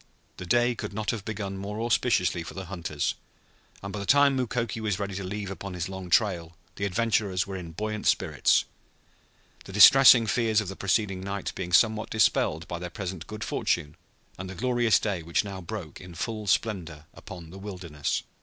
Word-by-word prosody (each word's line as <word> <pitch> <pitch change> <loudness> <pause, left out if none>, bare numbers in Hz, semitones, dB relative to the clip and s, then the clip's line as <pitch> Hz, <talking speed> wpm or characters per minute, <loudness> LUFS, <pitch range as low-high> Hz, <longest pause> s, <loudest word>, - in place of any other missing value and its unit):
The 90 - -7
day 120 +5 +3
could 105 -3 -6
not 105 0 -1
have 110 -3 -5
begun 100 -2 -5
more 105 +2 -5
auspiciously 115 -6 +1
for 85 - -8
the 95 0 -6
hunters, 85 -5 -3 0.7
and 100 -1 -6
by 105 - -4
the 100 - -4
time 140 -1 +5
Mukoki 120 -3 -2
was 105 -4 -1
ready 100 -1 -4
to 95 +1 -4
leave 100 +1 -4
upon 95 -1 -7
his 90 +1 -3
long 95 -1 -7
trail 85 -4 +1 0.2
the 100 - -2
adventurers 100 -2 0
were 100 - -6
in 85 -3 -7
buoyant 110 +3 -3
spirits, - - +2 1.0
the - - -9
distressing 120 +4 +8
fears 110 -1 +2
of 105 -4 -3
the 95 - -6
preceding 95 0 0
night 100 +1 -4
being 90 -2 -5
somewhat 110 +3 +3
dispelled 80 -7 +1
by 85 - -5
their 90 0 -5
present 90 -1 -6
good 110 0 -6
fortune 75 +1 -1 0.4
and 95 0 -6
the 95 - -7
glorious 120 +1 +2
day 100 -5 -2
which 85 +4 0
now 100 -2 -7
broke 85 -3 -7
in 90 -2 -11
full 110 +2 -4
splendor 85 -8 -1
upon 85 -3 -11
the 95 - -10
wilderness. 85 -8 -4
100 Hz, 190 wpm, -27 LUFS, 90-110 Hz, 1.0 s, distressing